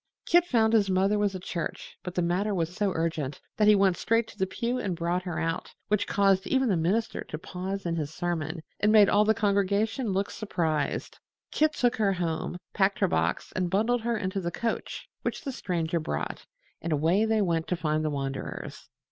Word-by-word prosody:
Kit 345 0 +4
found 225 -6 +3
his 205 -3 +4
mother 195 +3 +2
was 205 -2 +1
at 185 - -6
church, 170 -3 -5
but 180 0 -7
the 180 - +1
matter 190 +4 0
was 170 -1 -1
so 205 -1 +1
urgent 160 -4 -2 0.2
that 210 - +4
he 210 - +8
went 195 -2 +4
straight 230 +3 +1
to - - -13
the 190 - 0
pew 235 +6 -2
and 190 -7 -2
brought 170 +2 -1
her 180 -3 -4
out, 165 0 -3
which 210 -1 +1
caused 195 -1 +3
even 265 -2 +2
the 195 - +3
minister 190 +8 0
to 155 - -6
pause 190 +4 -5
in 170 -1 -1
his 150 -2 -3
sermon 160 -1 -3 0.2
and 210 - +3
made 210 -2 +7
all 205 +1 +5
the 220 +1 +3
congregation 205 +3 +1
look 195 +1 -1
surprised. 165 -8 -2 0.3
Kit 310 0 +2
took 245 -4 +1
her 205 -3 +2
home, 175 -1 -2 0.2
packed 195 -1 +2
her - - +2
box 80 +1 -1
and 180 -2 0
bundled 225 +6 +2
her 235 0 0
into 190 -1 -2
the 170 - -2
coach 230 +5 -3
which - - -3
the 280 - -3
Stranger 170 -7 -1
brought, 155 - -4 0.3
and 170 - -3
away 165 +7 +3
they 220 -1 +2
went 165 -3 0
to 180 - 0
find 155 -2 0
the 155 - 0
wanderers. 135 -2 -5
190 Hz, 205 wpm, -28 LUFS, 170-215 Hz, 0.3 s, he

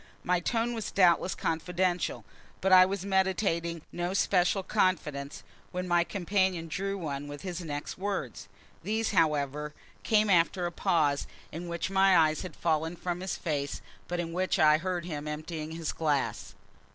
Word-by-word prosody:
My 180 0 +2
tone 230 +6 0
was 225 -2 -4
doubtless 180 -1 +3
confidential, 175 +2 -1 0.3
but 190 0 +2
I 185 0 +9
was 195 0 -3
meditating 190 -4 0
no 175 +2 -2
special 190 0 +2
confidence 150 -7 -1 0.3
when 180 0 -3
my 175 -1 +3
companion 185 -2 0
drew 195 +4 -2
one 145 -5 -4
with 145 0 -8
his 180 -2 -4
next 145 0 -5
words. 190 - -3 0.3
These, 220 +5 -1
however, 150 -4 +1 0.3
came 215 -1 +3
after 175 0 +3
a 175 - -2
pause, 150 -4 +1 0.2
in 170 +3 -6
which 170 +2 -3
my 195 -1 +5
eyes 155 -1 +3
had 185 -5 -7
fallen 160 0 0
from 175 0 -3
his 190 0 -3
face, 145 -4 -2 0.3
but 175 0 -3
in 165 -1 -3
which 185 +2 0
I 155 -2 +5
heard 175 -1 -2
him 150 -3 -5
emptying 155 +1 -5
his 165 -1 -3
glass. 135 -10 -1
175 Hz, 160 wpm, -29 LUFS, 155-185 Hz, 0.3 s, I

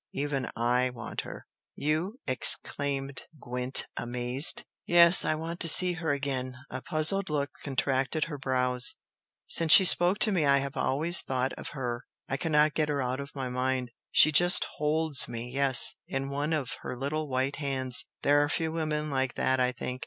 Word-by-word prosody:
Even 140 -2 -4
I 125 +2 -1
want 120 -2 -8
her!" - - -12 0.3
"You?" 155 +8 -3
exclaimed 135 +1 +3
Gwent, 125 +1 0
amazed. 125 +4 0 0.2
"Yes! 170 +1 +5
I - - -1
want 165 +2 -7
to 170 - +1
see 180 +3 +7
her 170 -3 -4
again!" 130 -2 -4
A 130 - -6
puzzled 160 +7 +2
look 145 -2 -3
contracted 135 +2 -2
her 150 -4 -7
brows. 125 -2 +2 0.5
"Since 165 -1 +4
she 190 - +8
spoke 175 +2 +4
to 215 - +4
me 180 -5 -1
I 140 -1 +3
have 140 0 -5
always 160 +6 0
thought 130 0 -4
of - - -9
her, 120 -2 -6 0.2
I 135 - -3
cannot 150 0 0
get 155 -1 -2
her 145 -1 -3
out 130 +1 -4
of 140 +1 -10
my 135 -2 -5
mind! 125 0 -4 0.2
She 155 - +4
just 175 +4 +4
HOLDS 150 -1 +1
me 120 +1 -8
yes! 135 -1 +4
in 135 0 -5
one 145 +3 -4
of 150 -6 -4
her 125 - -8
little 150 +4 -4
white 130 +2 -3
hands! 130 -3 0 0.2
There 145 +1 +2
are 145 - -3
few 160 0 -3
women 155 -2 -4
like 130 -2 -2
that 130 0 -1
I 125 0 +1
think! 125 0 -7
140 Hz, 180 wpm, -26 LUFS, 130-155 Hz, 0.5 s, she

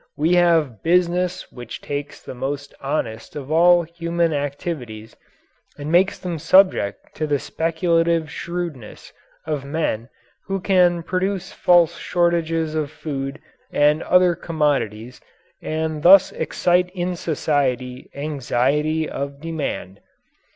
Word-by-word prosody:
We 160 +4 +2
have 165 - +3
"business" 180 +1 +1
which 120 -2 -8
takes 145 0 -6
the - - -8
most 140 +3 -5
honest 115 -6 -3
of 145 0 -6
all 175 +2 +5
human 170 0 -1
activities 140 - -5 0.6
and 145 +2 -5
makes 185 +3 +3
them 175 -4 -5
subject 185 - +3
to 155 - -1
the 145 -1 +1
speculative 165 +1 0
shrewdness 170 -10 -6 0.3
of 150 -3 -2
men 140 -6 -2 0.4
who 195 0 -1
can 180 -3 +3
produce 190 +2 -2
false 175 -1 +3
shortages 165 -2 0
of 155 -2 -1
food 140 -2 -5 0.3
and 150 +2 +3
other 180 -1 +4
commodities, 140 -9 -2 0.4
and 155 -1 -3
thus 190 +3 +7
excite 180 0 +1
in 180 0 -2
society 130 -6 -1
anxiety 150 +2 0
of 140 0 -5
demand. 150 - -4
160 Hz, 115 wpm, -21 LUFS, 140-175 Hz, 0.6 s, thus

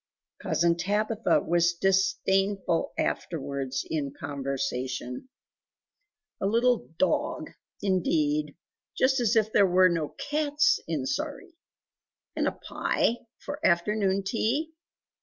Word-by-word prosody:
Cousin 170 0 +2
Tabitha 210 -1 +1
was 170 +1 +2
disdainful 190 0 +1
afterwards 140 -4 -2
in 145 -3 -2
conversation 135 - -3 1.1
"A 195 - +1
little 235 +3 +2
DOG 280 - 0 0.3
indeed! 150 -6 +1 0.4
Just 265 +1 +3
as 235 -1 +2
if 220 -1 +2
there 200 -2 +5
were 185 +1 +5
no 165 -4 -2
CATS 300 +9 +1
in - - -2
Sawrey! 375 -3 -4 0.8
And - - +1
a - - +2
PIE 235 - -1 0.3
for 290 +2 -6
afternoon 195 +2 +2
tea! 245 +10 -1
190 Hz, 100 wpm, -27 LUFS, 155-225 Hz, 1.1 s, there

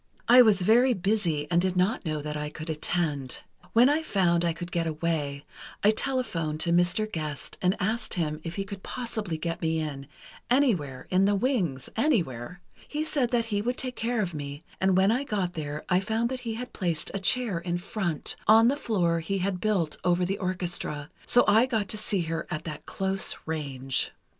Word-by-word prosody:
"I 245 +2 +9
was 210 -6 +5
very 240 +5 +5
busy, 185 -6 0
and 175 0 +4
did 185 0 0
not 185 +2 +1
know 155 -2 -2
that 150 0 -4
I 150 0 -3
could 155 +2 -6
attend. 150 -4 -2 0.3
When 235 +3 +6
I 295 +3 +2
found 175 - +2
I 170 - +2
could 175 +2 -7
get 170 -1 0
away, 155 -3 -2 0.4
I 210 - +6
telephoned 215 - -1
to 170 - +2
Mr. 175 +4 +3
Gest 155 -8 -4
and 185 +1 +2
asked 220 +4 -1
him 155 -3 -2
if 165 0 -5
he 195 - -1
could 195 -1 -8
possibly 220 -9 -3
get 165 +1 -4
me 160 0 +1
in, 140 -3 -5 0.4
anywhere—in 185 - +2
the 205 0 +3
wings—anywhere. 180 - -1 0.3
He 300 +1 -2
said 280 -6 0
that 235 -2 +1
he 205 - +1
would 245 +3 -2
take 255 -1 -3
care 230 -1 0
of 175 -3 -4
me, 145 0 -6 0.2
and 190 -1 +3
when 190 +2 +4
I 250 +4 +1
got 195 -8 -2
there 150 -2 -5
I 180 -1 +3
found 220 +4 0
that 260 0 -4
he 230 -3 -4
had 250 +2 -7
placed 170 -5 -1
a 200 - -2
chair 210 -2 +1
in 175 0 -2
front, 175 -4 -2
on 225 +2 +7
the 275 - +1
floor 175 - +1
he 195 +5 -2
had 185 -1 -2
built 190 -8 0
over 180 0 +2
the 195 +2 -2
orchestra, 175 -6 -2 0.2
so 245 - +5
I 220 +4 +5
got 220 -6 -1
to - - 0
see 210 -3 +1
her 165 0 -3
at 155 -3 -4
that 155 -2 -7
close 195 0 0
range. 135 -4 -1
185 Hz, 195 wpm, -27 LUFS, 160-220 Hz, 0.4 s, I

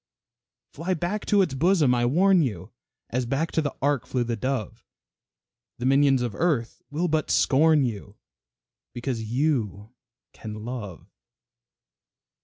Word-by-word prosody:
Fly 180 +4 -2
back 175 +6 -3
to 205 -2 +4
its 180 - -3
bosom, 155 -2 +3
I 120 -1 +1
warn 185 +6 +4
you 100 - -3 0.4
As 125 0 -1
back 140 +6 -1
to 160 - +1
the 145 -2 -3
ark 140 -4 +1
flew 125 -1 0
the 120 0 -2
dove 130 -2 -3 0.9
The 120 - -4
minions 135 -1 +4
of 120 -4 -3
earth 140 - -1
will 160 +5 -1
but 155 -2 0
scorn 150 +1 +4
you, 105 -3 -6 0.8
Because 120 -1 -3
you 110 - -1 0.4
can 110 -1 -8
love. 110 -8 -7
130 Hz, 135 wpm, -25 LUFS, 115-155 Hz, 0.9 s, to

